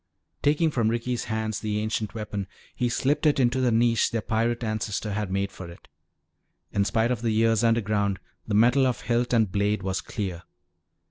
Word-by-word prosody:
Taking 155 +2 +2
from 115 -5 +1
Ricky's 120 +1 -2
hands 110 -1 -2
the 105 -1 -2
ancient 110 0 -2
weapon, 105 -3 -4 0.3
he 125 - -1
slipped 140 +6 +1
it 145 - +3
into 125 0 +2
the 125 -2 +2
niche 115 0 +3
their 115 -2 -2
pirate 115 +2 0
ancestor 110 -1 -2
had 105 -1 -2
made 100 +1 -1
for 95 -2 -9
it. 85 - -14 0.9
In 100 - +2
spite 115 +3 +1
of 120 -3 -1
the 115 - 0
years 115 0 +2
underground, 105 -4 +1 0.3
the 105 - 0
metal 125 +5 +5
of 125 - -2
hilt 120 +2 0
and 110 -5 +2
blade 100 0 0
was 95 0 -1
clear. 95 -6 -4
110 Hz, 185 wpm, -26 LUFS, 105-120 Hz, 0.9 s, metal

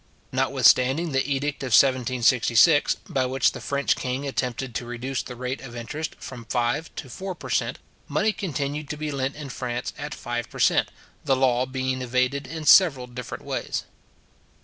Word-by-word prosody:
Notwithstanding 135 +7 +3
the 135 -1 +2
edict 140 +1 -1
of 130 -4 -2
1766, 130 +2 +4
by 130 -1 0
which 130 +1 +2
the - - -8
French 140 0 +1
king 130 +2 -3
attempted 130 -2 -3
to 120 - -3
reduce 125 +2 -3
the 125 - -8
rate 125 +2 -4
of 125 -3 -9
interest 145 +7 -5
from 120 -3 -9
five 120 +7 -1
to 135 - -6
four 185 +8 -6
per - - -8
cent. - - 0 0.3
money 215 - +1
continued 150 -6 -3
to 150 - -4
be 155 0 -3
lent 135 0 -2
in 145 -2 -7
France 125 -1 -4
at 145 0 -5
five 120 0 -4
per - - -11
cent. - - +3 0.4
the 135 -2 +3
law 130 -1 +2
being 130 0 -2
evaded 125 +2 0
in 160 +1 -6
several 145 -8 +6
different 125 0 -7
ways. - - -3
130 Hz, 170 wpm, -25 LUFS, 125-145 Hz, 0.4 s, several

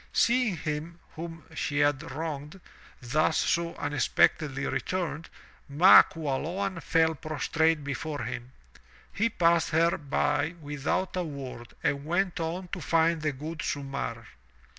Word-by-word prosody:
Seeing 235 -6 +3
him, 155 +3 -4 0.2
whom 165 0 -7
she 145 - -2
had 145 -1 +3
wronged, 150 +3 -5 0.4
thus 150 +6 +2
so 170 0 0
unexpectedly 140 0 +1
returned, 165 -3 -2 0.4
Ma 165 +7 +9
Qualoan 165 +5 -3
fell 160 0 +2
prostrate 155 +1 0
before 145 +2 -4
him. 120 +2 -6 0.6
He 230 +3 +1
passed 170 -5 +3
her 165 +3 +2
by 145 +2 0
without 145 +6 -2
a 180 - 0
word 135 -6 -8
and 140 -1 0
went 175 +3 0
on 175 +3 -3
to - - -5
find 165 0 +2
the 150 0 0
good 155 +4 -7
Sumarr. 135 -5 -4
160 Hz, 125 wpm, -28 LUFS, 145-170 Hz, 0.6 s, Ma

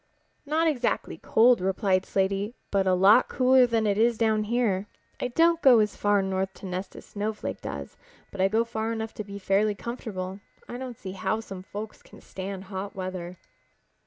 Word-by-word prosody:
"Not 320 +3 +2
exactly 285 -6 -1
cold," 235 -1 +4
replied 190 0 +1
Slaty, 195 +4 0 0.2
"but 195 -1 +2
a 185 - +4
lot 200 +7 +5
cooler 255 -1 +5
than 225 -2 +1
it 205 0 +1
is 230 0 +3
down 220 -1 +2
here. 210 -4 0 0.3
I - - -1
don't 330 +6 +3
go 255 -3 +7
as 210 -2 +2
far 205 -1 +2
north 190 0 -2
to - - -11
nest 185 +1 -5
as - - -11
Snowflake 210 +1 -4
does, 70 -1 -7 0.3
but 195 - -4
I 190 - +5
go 220 +3 +2
far 225 -1 -3
enough 225 -1 -4
to 215 - -5
be 200 0 -8
fairly 200 +2 +1
comfortable. 200 -5 -6 0.3
I 245 - -6
don't 255 -3 -6
see 190 - -7
how 195 +3 -1
some 195 -4 -8
folks 210 +3 -8
can - - -16
stand 190 0 -7
hot 195 +1 -6
weather." 185 -1 -5
205 Hz, 190 wpm, -27 LUFS, 190-230 Hz, 0.3 s, go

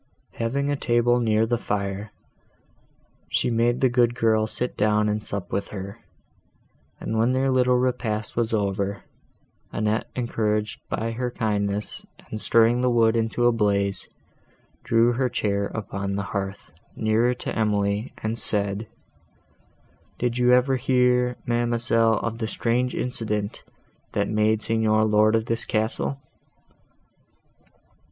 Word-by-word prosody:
Having 140 +5 0
a - - +1
table 120 -2 +2
near 110 -1 +2
the 120 +1 -1
fire, 100 0 -3 1.2
she - - +1
made 120 +1 +1
the 130 - +5
good 120 -1 +2
girl 110 -2 +2
sit 125 +3 -3
down 105 0 +2
and 105 0 -1
sup 100 -5 -4
with 100 - -2
her; 100 -1 -7 1.0
and, 110 - -2
when 120 +3 +3
their 135 +1 +1
little 125 -1 +3
repast 115 -4 -1
was 115 -1 0
over, 100 -2 -1 0.7
Annette, 110 +1 -1
encouraged 110 -3 -1
by 115 +1 -2
her 125 +2 -2
kindness 105 -3 -1 0.3
and 110 - -3
stirring 115 +2 +4
the 125 - +2
wood 115 -1 +3
into 115 +1 0
a 120 - +6
blaze, 100 -3 0 0.7
drew 115 +1 +3
her 125 +1 0
chair 100 -3 -1
upon 100 -2 -4
the 100 - -2
hearth, 100 -3 -4 0.2
nearer 115 +3 +2
to - - -5
Emily, 105 0 0
and 110 +1 -2
said—"Did 105 +3 -4
you 125 0 +4
ever 125 +1 +4
hear, 125 -1 +2
ma'amselle, 120 -1 +2
of 115 0 -3
the 110 - -2
strange 125 +3 -1
accident, 105 -4 -2 0.5
that 100 - 0
made 110 0 +1
the - - -3
Signor 110 -1 +2
lord 110 +1 +4
of 110 0 0
this 115 0 -1
castle?" 110 +5 -2
110 Hz, 135 wpm, -24 LUFS, 105-120 Hz, 1.2 s, a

